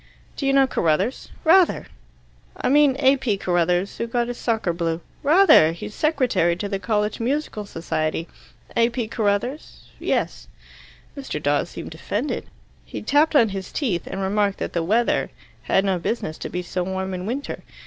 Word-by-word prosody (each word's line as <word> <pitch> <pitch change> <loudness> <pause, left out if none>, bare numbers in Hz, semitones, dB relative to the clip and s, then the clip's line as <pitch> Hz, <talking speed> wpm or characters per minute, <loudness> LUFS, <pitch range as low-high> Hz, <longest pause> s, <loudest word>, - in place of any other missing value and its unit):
"Do 275 - -2
you 275 - +3
know 275 -1 +6
Carruthers?" 190 - 0
"Rather!" 350 +1 +4 0.7
"I - - 0
mean 285 -1 +5
A. 275 0 +4
P. 240 -7 -1
Carruthers, 180 +1 0
who 230 - -1
got 240 +1 -1
his 245 - -5
socker 220 -7 0
blue." 165 -1 -1 0.2
"Rather! 305 - +6
He's 175 +5 -8
secretary 245 - +1
to 205 +4 -4
the 195 -1 -3
college 210 0 -1
musical 235 -4 -2
society." 165 -1 -2 0.5
"A. 230 0 +4
P. 235 -2 -3
Carruthers?" 225 +5 -2
"Yes." - - -1 0.7
Mr. 270 - -5
Dawes 145 0 0
seemed - - -8
offended. - - -3 0.4
He - - -7
tapped 295 +7 +3
on 230 -6 +5
his 195 -1 -6
teeth, 215 - -2
and 195 - -4
remarked 200 0 +1
that - - -4
the 170 - 0
weather 220 +8 +1 0.4
bad 195 - +3
no 190 -2 +1
business 165 -4 -3
to - - -5
be 180 0 -3
so 180 +1 -3
warm 190 +1 -3
in 180 +1 -4
winter. 270 +5 -4
210 Hz, 170 wpm, -23 LUFS, 180-260 Hz, 0.7 s, know